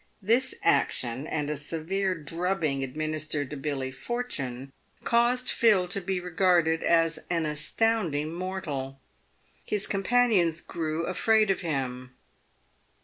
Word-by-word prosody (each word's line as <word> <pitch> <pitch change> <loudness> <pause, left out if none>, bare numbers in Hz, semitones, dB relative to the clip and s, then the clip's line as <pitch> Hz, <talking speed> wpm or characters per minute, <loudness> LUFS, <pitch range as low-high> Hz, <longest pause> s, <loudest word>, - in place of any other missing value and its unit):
This 235 +6 +1
action, 130 -1 +1
and 150 -2 -2
a 150 - -1
severe 170 +6 -2
drubbing 165 -3 -1
administered 155 +1 -3
to - - -4
Billy 135 -2 -3
Portune, 135 - -4 0.3
caused 240 +2 +2
Phil 205 -6 +4
to 200 +2 0
be 190 0 -1
regarded 175 -2 +2
as 165 -1 +3
an 165 -2 0
astounding 155 0 0
mortal. 160 -7 -4 0.6
His 210 -1 -1
companions 195 -5 +2
grew 160 -1 -3
afraid 215 +2 +3
of 190 - -1
him. 130 -5 -3
165 Hz, 115 wpm, -27 LUFS, 145-195 Hz, 0.6 s, Phil